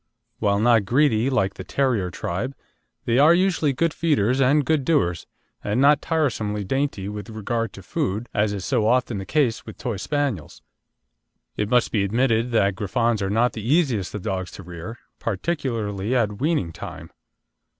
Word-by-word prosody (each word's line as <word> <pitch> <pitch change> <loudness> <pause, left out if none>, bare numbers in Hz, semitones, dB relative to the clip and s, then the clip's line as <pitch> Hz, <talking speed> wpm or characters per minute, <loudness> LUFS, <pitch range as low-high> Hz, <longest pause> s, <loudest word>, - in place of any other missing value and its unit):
While 100 0 +2
not 115 -2 +4
greedy, 125 0 +2
like 95 -8 +1
the - - -8
Terrier 120 -10 0
tribe, 105 +10 -4 0.5
they 120 +2 +2
are 155 +4 +7
usually 175 -5 +2
good 160 +4 0
feeders 135 -6 +1
and 140 +2 +3
good 155 -3 +1
doers, 90 - +1 0.4
and 105 +4 0
not 140 +2 +5
tiresomely 110 -10 -1
dainty 135 -2 -2
with 105 +2 -6
regard 115 0 -2
to 100 - -11
food, 100 +5 -2
as 105 0 +1
is 100 -2 -4
so 115 -5 +1
often 120 -3 +1
the 95 - -7
case 135 -7 +1
with - - -10
Toy 120 -5 -3
Spaniels. 140 - -3 0.9
It 105 -1 -2
must 125 0 +3
be 105 -3 +1
admitted 115 +3 +1
that 100 -4 +2
Griffons 110 +4 0
are 95 - -1
not 115 +3 +2
the 110 - -6
easiest 125 - +1
of 105 - -5
dogs 95 -2 -3
to 95 - -9
rear, 90 +6 -8 0.2
particularly 115 - -2
at 105 -4 0
weaning 145 - 0
time. - - -9
115 Hz, 170 wpm, -23 LUFS, 100-135 Hz, 0.9 s, are